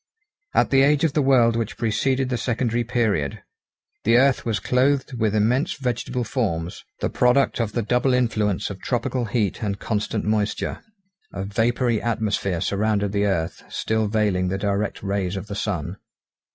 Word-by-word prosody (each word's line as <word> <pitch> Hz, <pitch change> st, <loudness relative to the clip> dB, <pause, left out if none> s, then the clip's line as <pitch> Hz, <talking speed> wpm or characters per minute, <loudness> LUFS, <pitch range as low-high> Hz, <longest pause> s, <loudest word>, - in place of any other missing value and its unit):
At -, -, +3 dB
the 135 Hz, -1 st, +5 dB
age 145 Hz, +2 st, +3 dB
of 160 Hz, -4 st, +2 dB
the 150 Hz, -, +2 dB
world 125 Hz, -4 st, +4 dB
which 115 Hz, 0 st, -3 dB
preceded 130 Hz, +4 st, 0 dB
the 130 Hz, -, 0 dB
secondary 120 Hz, -1 st, 0 dB
period, 110 Hz, -, -1 dB, 0.6 s
the 115 Hz, +2 st, +4 dB
earth 135 Hz, +1 st, +3 dB
was 110 Hz, -4 st, 0 dB
clothed 130 Hz, +5 st, +1 dB
with 110 Hz, -2 st, +1 dB
immense 120 Hz, +7 st, +2 dB
vegetable 125 Hz, -1 st, -2 dB
forms, 95 Hz, -9 st, -2 dB, 0.2 s
the -, -, 0 dB
product 125 Hz, +2 st, +2 dB
of 115 Hz, -3 st, -1 dB
the 120 Hz, -, 0 dB
double 125 Hz, +4 st, +1 dB
influence 110 Hz, -6 st, 0 dB
of -, -, -9 dB
tropical 125 Hz, -2 st, -1 dB
heat 105 Hz, -3 st, -1 dB
and 100 Hz, -2 st, -2 dB
constant 110 Hz, 0 st, -2 dB
moisture; 105 Hz, -1 st, -1 dB, 0.5 s
a 95 Hz, -, -4 dB
vapoury 115 Hz, +2 st, +1 dB
atmosphere 105 Hz, -6 st, -1 dB
surrounded 100 Hz, 0 st, 0 dB
the 100 Hz, 0 st, +1 dB
earth, 85 Hz, -4 st, -1 dB
still 110 Hz, -1 st, -1 dB
veiling 100 Hz, -4 st, +1 dB
the 95 Hz, +2 st, -1 dB
direct 100 Hz, 0 st, -2 dB
rays 100 Hz, -2 st, -1 dB
of 95 Hz, -, -5 dB
the 105 Hz, -, -7 dB
sun. 95 Hz, -7 st, -3 dB
110 Hz, 165 wpm, -23 LUFS, 100-125 Hz, 0.6 s, the